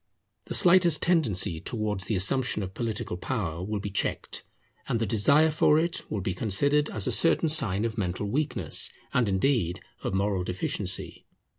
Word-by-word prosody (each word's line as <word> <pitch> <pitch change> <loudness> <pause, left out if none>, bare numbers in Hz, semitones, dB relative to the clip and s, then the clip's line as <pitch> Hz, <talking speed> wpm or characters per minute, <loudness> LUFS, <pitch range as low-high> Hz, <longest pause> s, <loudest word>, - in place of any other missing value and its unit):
The - - -2
slightest 175 -4 +5
tendency 105 - +1
towards 105 -3 -3
the 105 - -1
assumption 105 +3 +1
of 95 0 -7
political 110 -6 -4
power 90 -6 -4
will 105 +2 -3
be 100 0 -5
checked, 100 - -3 0.4
and 125 - 0
the 115 - -1
desire 140 +10 +3
for 150 0 +3
it 170 +2 -2
will 105 - -3
be 95 - -2
considered 140 +10 0
as 105 -3 -3
a - - 0
certain 165 -1 +3
sign 110 -9 +2
of 115 -1 -3
mental 90 +1 -3
weakness, 145 +8 -1 0.2
and 120 -4 +2
indeed 95 -3 0 0.2
of - - -3
moral 100 -1 0
deficiency. 90 +1 -2
105 Hz, 165 wpm, -27 LUFS, 95-140 Hz, 0.4 s, slightest